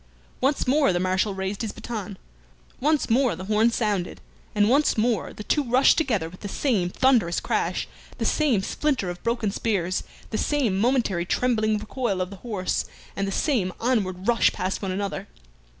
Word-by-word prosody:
Once 275 +2 +1
more 275 -2 +3
the 175 - 0
Marshal 185 +2 0
raised 190 +2 -3
his 220 -3 -2
baton, 210 -5 -6 0.6
once 300 +2 +2
more 245 -3 +2
the 180 - -7
horn 215 +3 +3
sounded, 210 -6 -1 0.4
and 205 0 +4
once 280 +3 +3
more 225 -1 +1
the 210 - -8
two 295 +7 +1
rushed 255 +2 +4
together 225 - 0
with 180 +2 -12
the 205 - -6
same 200 -5 0
thunderous 230 -6 +2
crash, - - -1 0.3
the - - -2
same 265 -11 +2
splinter 260 -7 -1
of 175 - -9
broken 230 -3 0
spears, 190 -4 -1 0.3
the 215 - -1
same 275 -10 +1
momentary 225 -7 +1
trembling 215 +1 +1
recoil 215 -1 -2
of 185 +1 -2
the 200 - -8
horse, 205 -4 -2 0.3
and 195 0 -1
the - - -2
same 205 -5 +1
onward 200 -6 0
rush 240 -1 +4
past 185 +1 -3
one 195 - -3
another. 200 +1 -3
215 Hz, 175 wpm, -25 LUFS, 190-250 Hz, 0.6 s, and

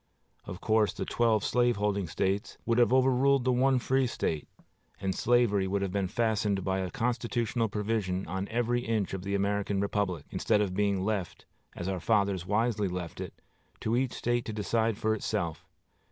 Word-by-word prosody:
Of 90 - -7
course, 110 -1 +2
the - - -4
twelve 115 -4 +2
slaveholding 105 -6 +1
States 95 +4 -1
would 115 0 +2
have 120 -2 +4
overruled 130 +1 +4
the 130 - +3
one 130 +1 +3
free 130 +1 +1
State; 80 -9 -2 0.5
and 95 -1 -1
slavery 110 -5 +2
would 100 +1 0
have 95 - -2
been 100 -1 0
fastened 105 -2 0
by 95 +1 0
a 95 -1 -2
constitutional 115 0 -1
provision 100 -3 -1
on 95 +3 -3
every 120 +1 0
inch 110 -5 -1
of 95 - -3
the 100 +2 -2
American 100 0 0
republic, 100 -5 -1
instead 105 -2 +1
of 100 -3 0
being 100 -1 +1
left, 100 -5 -3 0.3
as 85 - -5
our 95 -1 -1
fathers 100 -2 +1
wisely 105 0 +1
left 90 -2 -5
it, - - -7 0.5
to 110 - 0
each 130 0 0
State 120 0 0
to 110 - -4
decide 110 +1 0
for 110 0 +1
itself. 100 -6 -3
105 Hz, 175 wpm, -29 LUFS, 95-120 Hz, 0.5 s, have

